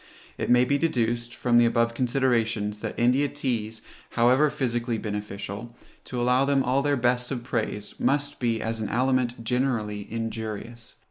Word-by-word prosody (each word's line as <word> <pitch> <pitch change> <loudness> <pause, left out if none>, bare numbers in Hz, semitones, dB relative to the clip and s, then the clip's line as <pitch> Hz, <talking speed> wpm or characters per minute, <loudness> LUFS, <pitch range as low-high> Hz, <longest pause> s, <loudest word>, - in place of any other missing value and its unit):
It - - -3
may 125 0 +5
be 140 +2 +1
deduced, 120 -6 0
from 120 -1 +3
the 120 - +6
above 115 0 +1
considerations, 115 -4 0
that - - -5
India 125 +4 +3
teas, 115 -6 -3 0.3
however 125 +5 +4
physically 120 -3 -1
beneficial, 105 +1 -5 0.3
to 125 - -4
allow 125 +2 +3
them 140 -1 +2
all 130 +2 +2
their 145 0 +1
best 125 0 +1
of 125 -3 -4
praise, 110 -4 -3
must 145 +1 0
be 115 -2 0
as 115 0 -2
an 105 - -2
aliment 125 -1 +1
generally 115 -5 -1
injurious. 115 0 -5
120 Hz, 155 wpm, -26 LUFS, 115-130 Hz, 0.3 s, the